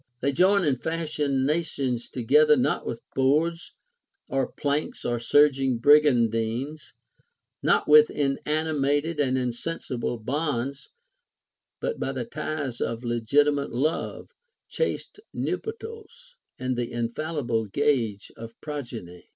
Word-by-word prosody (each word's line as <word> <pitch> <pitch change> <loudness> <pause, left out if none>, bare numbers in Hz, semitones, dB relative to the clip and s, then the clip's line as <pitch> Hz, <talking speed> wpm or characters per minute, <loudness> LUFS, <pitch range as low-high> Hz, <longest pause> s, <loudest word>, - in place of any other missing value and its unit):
They 140 - +1
join 190 +7 +4
and 135 -6 0
fasten 150 -5 -1
nations 140 -6 -1
together 150 +5 +4
not 125 - 0
with 115 - -5
boards 155 +6 +1 0.5
or 135 -1 -1
planks, 145 +1 -2
or 120 -1 0
surging 135 0 +3
brigandines, 125 0 +2 0.7
not - - +2
with 150 0 +8
inanimate 150 +1 0
and 130 -2 +2
insensible 125 0 -3
bonds, 140 +2 -3 0.9
but - - -3
by 135 - -2
the 125 -3 -3
ties 150 -3 -4
of 115 +1 -2
legitimate 140 +5 +1
love, 145 +7 -2 0.4
chaste 480 - -3 0.2
nuptials, 455 +2 -6 0.2
and 130 0 -2
the 120 -1 -3
infallible 120 -1 -2
gage 115 -3 0
of 115 0 -10
progeny." 120 - -7
140 Hz, 110 wpm, -26 LUFS, 120-150 Hz, 0.9 s, with